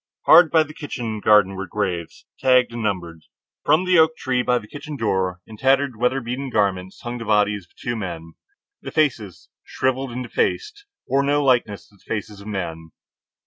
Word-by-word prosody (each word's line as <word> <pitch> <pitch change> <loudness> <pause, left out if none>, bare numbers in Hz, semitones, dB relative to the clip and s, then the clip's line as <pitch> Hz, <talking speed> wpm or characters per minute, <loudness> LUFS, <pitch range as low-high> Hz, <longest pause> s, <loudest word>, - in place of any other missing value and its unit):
Hard 175 -2 +8
by 160 0 +4
the 155 0 -12
kitchen 120 -8 -5
garden 105 -2 +4
were 95 0 -5
graves, 90 -3 -4
tagged 125 -2 +3
and 120 - -4
numbered. 85 -6 -3 0.4
From 155 +5 +3
the 180 -2 +4
oak 160 0 +4
tree 130 -4 0
by 125 0 +2
the 115 - -6
kitchen 145 +3 -8
door, 95 -5 -1
in 110 - -12
tattered, 135 +1 +2
weatherbeaten 125 +2 -1
garments, 95 -4 -1
hung 120 0 -5
the 115 - -6
bodies 105 -2 +1
of - - -34
two 120 -1 -4
men. 85 -6 -6 0.5
The - - -7
faces, 115 - -1
shriveled 130 0 -2
and 125 +1 -4
defaced, 415 - -2 0.2
bore 135 +1 +2
no 145 +1 +1
likeness 120 -6 +1
to 100 - -24
the - - -28
faces 105 -1 -5
of 100 - -11
men. 80 -6 -5
115 Hz, 185 wpm, -22 LUFS, 100-135 Hz, 0.5 s, Hard